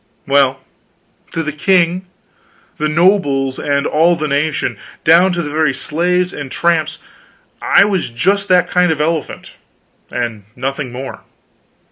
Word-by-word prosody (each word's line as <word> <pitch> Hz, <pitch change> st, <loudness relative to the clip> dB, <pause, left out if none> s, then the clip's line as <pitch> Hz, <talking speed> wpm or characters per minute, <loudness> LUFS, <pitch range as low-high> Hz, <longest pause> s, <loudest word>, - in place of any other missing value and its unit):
Well, 135 Hz, -1 st, +2 dB, 0.7 s
to 165 Hz, -, -2 dB
the 155 Hz, -, -3 dB
king, 180 Hz, +3 st, +1 dB, 0.7 s
the 155 Hz, 0 st, 0 dB
nobles, 150 Hz, -6 st, +2 dB
and 140 Hz, 0 st, 0 dB
all 165 Hz, +3 st, +3 dB
the 155 Hz, -2 st, -3 dB
nation, 150 Hz, +2 st, -1 dB, 0.2 s
down 170 Hz, +4 st, +5 dB
to 175 Hz, 0 st, -2 dB
the 145 Hz, -, -5 dB
very 155 Hz, -3 st, +1 dB
slaves 180 Hz, +5 st, 0 dB
and 140 Hz, -2 st, -7 dB
tramps, 160 Hz, -2 st, 0 dB, 0.6 s
I 200 Hz, -, +5 dB
was 195 Hz, -8 st, -1 dB
just 195 Hz, +12 st, 0 dB
that 180 Hz, -2 st, +3 dB
kind 180 Hz, -1 st, +2 dB
of 155 Hz, -, -2 dB
an 150 Hz, -, +2 dB
elephant, 160 Hz, -2 st, -4 dB, 0.6 s
and 115 Hz, -4 st, -4 dB
nothing 135 Hz, +1 st, -4 dB
more. 130 Hz, +2 st, -7 dB
155 Hz, 140 wpm, -16 LUFS, 140-180 Hz, 0.7 s, down